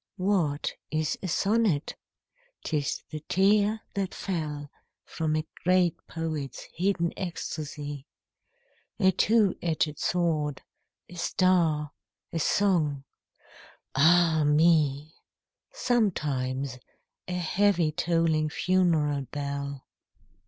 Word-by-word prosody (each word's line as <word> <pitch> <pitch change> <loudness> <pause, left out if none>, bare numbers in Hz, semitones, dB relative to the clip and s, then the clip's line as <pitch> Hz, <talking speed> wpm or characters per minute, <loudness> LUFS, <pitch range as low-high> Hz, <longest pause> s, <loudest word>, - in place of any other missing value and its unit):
What 180 -7 0 0.2
is 155 -1 0
a 190 - -3
sonnet? 200 -4 +1 0.7
'T 160 - -2
is 145 -2 -1
the 155 - -4
tear 205 +3 +3
that 195 -2 -2
fell 150 -6 -4 0.3
From 155 -2 -2
a 155 0 -1 0.2
great 180 -1 +3
poet's 155 -5 -4
hidden 175 -1 0
ecstasy; 150 -5 -5 0.9
A 190 -2 +5
two 210 +1 +3
edged 155 -3 -1
sword, 155 -5 0 0.4
a - - -14
star, 165 -4 +1 0.4
a 165 - -1
song 155 -6 +1 0.5
— - - -23
ah 160 +2 +5
me 150 -1 +3
I - - -32 0.5
Sometimes 140 - -1 0.5
a 180 - -4
heavy 180 -1 +2
tolling 160 -1 +1
funeral 155 -6 +1
bell. 140 -1 -4
160 Hz, 100 wpm, -27 LUFS, 150-185 Hz, 0.9 s, A